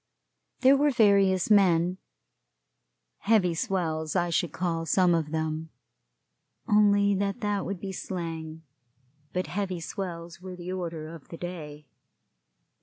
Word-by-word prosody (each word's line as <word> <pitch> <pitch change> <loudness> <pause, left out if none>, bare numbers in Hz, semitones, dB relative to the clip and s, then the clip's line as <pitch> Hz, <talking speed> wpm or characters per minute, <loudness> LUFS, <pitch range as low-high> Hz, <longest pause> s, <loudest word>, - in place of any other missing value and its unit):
There 265 +1 +7
were 290 +2 +3
various 200 -5 +3
men 180 -3 +4 1.2
heavy 200 -6 +3
swells 160 -2 -2
I 175 -1 +1
should 170 -1 0
call 165 -2 -2
some 180 +1 +4
of 160 -3 0
them, 160 0 -3 1.0
only 205 -1 +4
that 200 +3 -1
that 205 -3 -1
would 195 -1 -4
be 195 +1 -5
slang; 165 -4 -5 0.7
but 180 0 -1
heavy 185 -2 -3
swells 170 -1 -6
were 185 -1 -7
the 180 0 -6
order 165 -4 -4
of 165 -4 -12
the 165 - -9
day. 150 -4 -7
180 Hz, 125 wpm, -27 LUFS, 165-195 Hz, 1.2 s, There